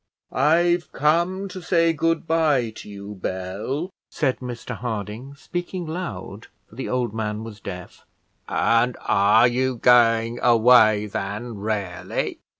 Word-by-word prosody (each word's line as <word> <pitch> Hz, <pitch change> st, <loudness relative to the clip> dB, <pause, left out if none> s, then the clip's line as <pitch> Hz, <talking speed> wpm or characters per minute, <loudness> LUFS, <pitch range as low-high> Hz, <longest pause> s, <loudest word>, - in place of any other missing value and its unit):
"I've 170 Hz, +4 st, +2 dB
come 170 Hz, +6 st, +1 dB
to 185 Hz, 0 st, -8 dB
say 165 Hz, -1 st, +2 dB
good 165 Hz, +2 st, 0 dB
bye 150 Hz, -8 st, +2 dB
to -, -, -10 dB
you, 100 Hz, 0 st, -8 dB
Bell," 100 Hz, -, -4 dB, 0.2 s
said 135 Hz, -5 st, -1 dB
Mr 125 Hz, -1 st, -6 dB
Harding, 115 Hz, +3 st, -5 dB
speaking 175 Hz, +4 st, -5 dB
loud, 120 Hz, -, -6 dB, 0.2 s
for -, -, -22 dB
the 130 Hz, +4 st, -5 dB
old 125 Hz, -4 st, -1 dB
man 110 Hz, -1 st, -3 dB
was 110 Hz, -2 st, -9 dB
deaf. 90 Hz, -2 st, -9 dB, 0.5 s
"And 115 Hz, +2 st, +2 dB
are 105 Hz, +4 st, +4 dB
you 130 Hz, +1 st, 0 dB
going 115 Hz, -1 st, +4 dB
away, 115 Hz, -3 st, +5 dB
then, 105 Hz, +3 st, -5 dB
really?" 100 Hz, -4 st, -3 dB
120 Hz, 130 wpm, -23 LUFS, 105-155 Hz, 0.5 s, away